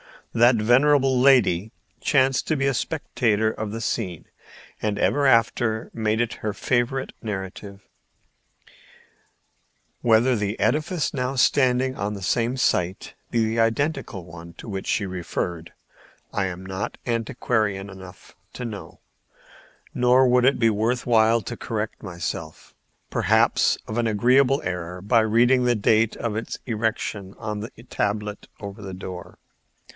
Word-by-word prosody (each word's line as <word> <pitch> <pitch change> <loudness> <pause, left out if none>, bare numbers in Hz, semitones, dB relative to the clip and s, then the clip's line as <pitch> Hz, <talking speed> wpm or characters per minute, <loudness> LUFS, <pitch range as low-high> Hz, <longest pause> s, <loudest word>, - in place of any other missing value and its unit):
That 120 +2 +5
venerable 130 +4 +4
lady 115 -7 +4 0.3
chanced 135 -2 +2
to 155 - +1
be 135 -1 0
a 135 - +2
spectator 110 -6 0
of 110 -1 -5
the 115 +1 -5
scene, 95 -7 -3 0.6
and 105 -1 -1
ever 145 +6 +2
after 115 -2 +2
made 110 0 0
it 115 -2 -2
her 105 -1 -4
favorite 125 +4 -1
narrative. 100 -1 -6 2.2
Whether 120 +2 +4
the 105 +1 -2
edifice 155 +2 0
now 130 -1 -2
standing 130 0 +2
on 100 +1 -2
the 100 - -7
same 120 +6 +1
site 90 -7 0 0.2
be 115 -1 +1
the 110 +1 -1
identical 115 - 0
one 85 0 -11
to 115 - -11
which 95 -1 -5
she 100 - 0
referred 90 -2 -4 0.6
I 100 - 0
am 95 0 -5
not 95 +1 -4
antiquarian 110 -4 -1
enough 95 -1 -12 0.2
to 125 - -6
know, 105 -4 -8 0.9
nor 125 +1 +4
would 125 0 +4
it 135 - +4
be 115 -1 +3
worth 115 +4 0
while 115 -1 +4
to 120 +2 -6
correct 110 -1 -4
myself, 85 -4 -6 0.4
perhaps, - - +3
of 110 - -5
an 120 -1 +1
agreeable 125 +6 +3
error 90 0 -4
by 115 +5 +3
reading 120 +3 +3
the 120 -1 +3
date 110 +1 +2
of 115 -3 -3
its 115 - -4
erection 110 -4 -3
on 105 -2 -4
the 110 +3 -6 0.2
tablet 105 0 -2
over 100 0 -7
the 95 -2 -7
door. 90 -2 -8
110 Hz, 140 wpm, -24 LUFS, 100-125 Hz, 2.2 s, That